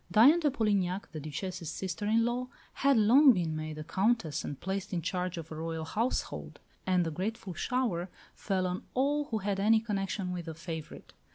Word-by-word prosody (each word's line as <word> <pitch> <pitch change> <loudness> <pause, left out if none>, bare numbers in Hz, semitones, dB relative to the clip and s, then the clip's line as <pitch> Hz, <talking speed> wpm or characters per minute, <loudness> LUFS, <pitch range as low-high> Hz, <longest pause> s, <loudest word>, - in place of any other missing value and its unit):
Diane 270 +10 +7
de 305 -3 +2
Polignac, 200 -7 0
the 155 - -5
Duchesse's 165 +3 -5
sister 190 +2 -3
in 225 +2 +3
law, 245 +1 -1 0.3
had 275 -2 +3
long 255 +6 +7
been 170 -5 -1
made 155 0 -4
a 155 - -5
Countess 190 -1 0
and 145 - -5
placed 190 +1 -3
in 170 -2 -1
charge 180 0 -2
of 165 -1 -7
a - - -5
Royal 160 0 -3
household; 230 +9 -2 0.3
and 180 -2 +3
the 165 - -2
grateful 195 +3 -4
shower 195 -4 -1 0.2
fell 190 -2 -1
on 180 +1 -2
all 290 +3 +2
who 225 - -2
had 200 -1 -1
any 220 +3 +5
connection 195 -3 -2
with 175 -2 -5
the 160 -2 -6
favourite. 160 -1 -7
190 Hz, 190 wpm, -31 LUFS, 170-225 Hz, 0.3 s, Diane